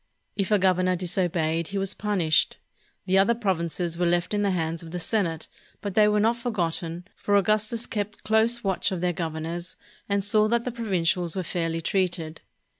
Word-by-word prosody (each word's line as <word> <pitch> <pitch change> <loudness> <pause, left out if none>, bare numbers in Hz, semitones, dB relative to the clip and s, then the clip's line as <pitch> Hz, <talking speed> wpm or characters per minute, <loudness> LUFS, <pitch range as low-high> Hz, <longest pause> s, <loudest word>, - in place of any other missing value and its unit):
If 195 -2 -1
a 210 - +5
governor 185 -1 +2
disobeyed, 170 -2 0
he 200 - -4
was 195 0 +2
punished. 185 -7 +1 0.5
The 190 +1 +3
other 230 +5 +4
provinces 175 -5 -1
were 175 - +2
left 175 +3 +1
in 205 - +1
the 200 - +2
hands 165 -3 -1
of 165 - -10
the 180 - -4
senate, 170 -2 -1 0.3
but 200 -2 -4
they 210 +1 +5
were 210 0 +3
not 225 +3 +2
forgotten, 175 -6 -2
for 205 - 0
Augustus 215 +4 +1
kept 210 -1 -4
close 225 +2 +2
watch 195 0 0
of 185 -3 -3
their 180 -1 +1
governors 165 +1 -4 0.3
and 200 0 +1
saw 215 +1 +3
that 235 +1 +1
the 250 - -1
provincials 180 -7 0
were 190 - -1
fairly 165 -1 -2
treated. 170 -3 -1
185 Hz, 185 wpm, -26 LUFS, 170-210 Hz, 0.5 s, a